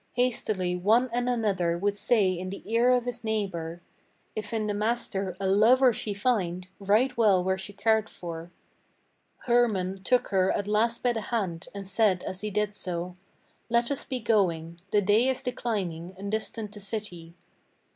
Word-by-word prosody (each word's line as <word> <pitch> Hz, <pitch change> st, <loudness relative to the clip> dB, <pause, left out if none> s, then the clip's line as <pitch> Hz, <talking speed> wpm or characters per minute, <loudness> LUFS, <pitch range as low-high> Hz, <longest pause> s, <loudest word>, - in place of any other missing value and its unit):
Hastily 215 Hz, -7 st, 0 dB
one 225 Hz, +7 st, +3 dB
and 245 Hz, +1 st, 0 dB
another 195 Hz, -8 st, +1 dB
would 200 Hz, +3 st, 0 dB
say 205 Hz, -2 st, +3 dB
in 185 Hz, +1 st, -4 dB
the 195 Hz, -, -7 dB
ear 230 Hz, +2 st, +3 dB
of 250 Hz, -1 st, +3 dB
his 245 Hz, -1 st, -4 dB
neighbor: 175 Hz, -6 st, -3 dB, 0.5 s
"If 215 Hz, -1 st, -4 dB
in 220 Hz, -2 st, -1 dB
the 210 Hz, -, -1 dB
master 205 Hz, -4 st, -2 dB
a 195 Hz, -, -2 dB
lover 235 Hz, +6 st, +5 dB
she 210 Hz, -1 st, -3 dB
find, 185 Hz, -5 st, 0 dB
right 215 Hz, +6 st, +2 dB
well 205 Hz, -6 st, +4 dB
were 190 Hz, +1 st, 0 dB
she 190 Hz, +2 st, -6 dB
cared 220 Hz, +2 st, +1 dB
for." 170 Hz, -1 st, -8 dB, 0.9 s
Hermann 205 Hz, -6 st, +2 dB
took 250 Hz, +3 st, +2 dB
her 190 Hz, -1 st, +3 dB
at 200 Hz, -, -1 dB
last 225 Hz, +3 st, +1 dB
by 245 Hz, -1 st, +3 dB
the 225 Hz, -, -3 dB
hand, 190 Hz, -7 st, -3 dB
and 200 Hz, -1 st, -6 dB
said 195 Hz, -2 st, +2 dB
as 185 Hz, -, -5 dB
he 210 Hz, -, -2 dB
did 210 Hz, 0 st, -1 dB
so: 180 Hz, -2 st, -5 dB, 0.5 s
"Let 235 Hz, +2 st, +2 dB
us 280 Hz, -, -1 dB
be 255 Hz, -, -4 dB
going; 170 Hz, -7 st, 0 dB
the 205 Hz, -1 st, +2 dB
day 210 Hz, +6 st, +4 dB
is 260 Hz, -1 st, -1 dB
declining, 190 Hz, -8 st, -3 dB
and 200 Hz, +1 st, -5 dB
distant 220 Hz, -1 st, -3 dB
the 210 Hz, -, -9 dB
city." 190 Hz, -5 st, -5 dB
205 Hz, 175 wpm, -27 LUFS, 185-230 Hz, 0.9 s, lover